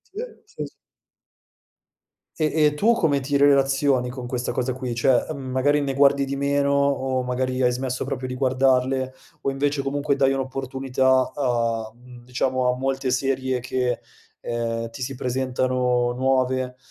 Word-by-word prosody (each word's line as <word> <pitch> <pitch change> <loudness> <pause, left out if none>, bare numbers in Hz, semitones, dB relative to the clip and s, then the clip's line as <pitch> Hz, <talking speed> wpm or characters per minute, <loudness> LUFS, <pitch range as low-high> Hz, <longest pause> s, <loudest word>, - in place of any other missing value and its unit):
Eh, 430 - -3 0.2
se 425 - -7
s - - -11 1.7
E 155 -2 +1
e 150 - +3
tu 210 +10 +3
come 155 -10 +2
ti 140 +1 0
relazioni 135 -2 +3
con 125 0 -7
questa 125 0 -2
cosa 130 +1 -1
qui, 125 -2 -4
cioè, 125 +1 +2
uhm, 155 - -4
magari 145 +3 +2
ne 140 -1 -1
guardi 140 0 +4
di 135 +1 -3
meno 140 0 +1
o 135 -2 +1
magari 130 +1 -1
hai 125 -1 +4
smesso 125 +1 -3
proprio 130 -1 -3
di 130 - -5
guardarle, 130 0 +1 0.3
o 135 - 0
invece 140 +1 -1
comunque 140 +1 0
dai 135 -1 +3
un'opportunità 130 0 0
a, 115 -4 0
uhm, 120 0 -15
diciamo 125 0 0
a - - -4
molte 135 0 -1
serie 130 0 0
che, 125 0 -1 0.4
ehm, 115 -1 -3
ti 115 +3 -7
si 135 - -4
presentano 125 -1 0
nuove, 130 0 0
130 Hz, 155 wpm, -23 LUFS, 125-140 Hz, 1.7 s, guardi